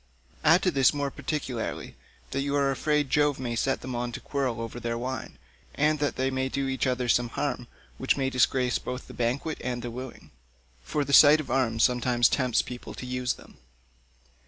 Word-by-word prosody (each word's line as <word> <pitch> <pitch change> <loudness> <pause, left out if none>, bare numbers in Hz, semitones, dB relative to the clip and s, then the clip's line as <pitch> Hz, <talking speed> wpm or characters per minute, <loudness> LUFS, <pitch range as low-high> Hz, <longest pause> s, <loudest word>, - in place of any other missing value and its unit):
Add 165 +4 +5
to 185 - +3
this 135 -1 +3
more 140 -1 -1
particularly 135 -5 -4 0.4
that 135 - -1
you 140 +1 -1
are 140 -1 +2
afraid 150 0 0
Jove 145 -2 +2
may 120 -2 -3
set 135 +4 0
them 130 - -6
on 120 0 -2
to - - -5
quarrel 130 -5 -2
over 115 +1 -5
their 115 -1 -2
wine, 130 +2 -5 0.4
and 150 +1 +2
that 145 -1 0
they 130 +1 0
may 130 0 -1
do 135 0 -2
each 130 0 -1
other 125 -1 0
some 120 0 +2
harm 130 -2 -3 0.3
which 130 - +1
may 135 -1 0
disgrace 130 -1 +2
both 125 0 -7
banquet 125 +6 -1
and 120 -1 -3
wooing, 125 +2 -8 0.5
for 145 - -2
the 140 - -3
sight 150 +2 +8
of 155 - -5
arms 115 -4 +1
sometimes 120 -1 +3
tempts 125 -3 +1
people 125 -1 -8
to - - -7
use 125 0 -1
them." - - -17
130 Hz, 190 wpm, -27 LUFS, 120-140 Hz, 0.5 s, sight